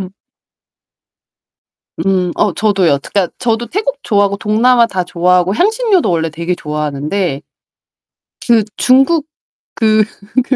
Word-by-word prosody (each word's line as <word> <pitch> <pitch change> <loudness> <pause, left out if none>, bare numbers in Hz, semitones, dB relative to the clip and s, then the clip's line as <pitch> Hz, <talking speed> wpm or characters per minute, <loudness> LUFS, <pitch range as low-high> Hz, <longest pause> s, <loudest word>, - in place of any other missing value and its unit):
음. 185 -1 -6 1.9
음 185 -2 +1
어 205 -3 +1
저도요. 190 -9 +1
그니까 195 -4 -1
저도 235 -1 -1
태국 440 +6 -2
좋아하고 200 -2 +1
동남아 230 +4 +3
다 190 -5 -2
좋아하고 180 +2 +1
향신료도 420 - +1
원래 165 -1 0
되게 170 +4 -3
좋아하는데 150 +1 -3 1.1
그 230 -4 +3
중국 270 +5 +3 0.5
그 215 -2 +2 0.4
그 265 +1 -1
200 Hz, 245 characters per minute, -14 LUFS, 175-240 Hz, 1.9 s, 동남아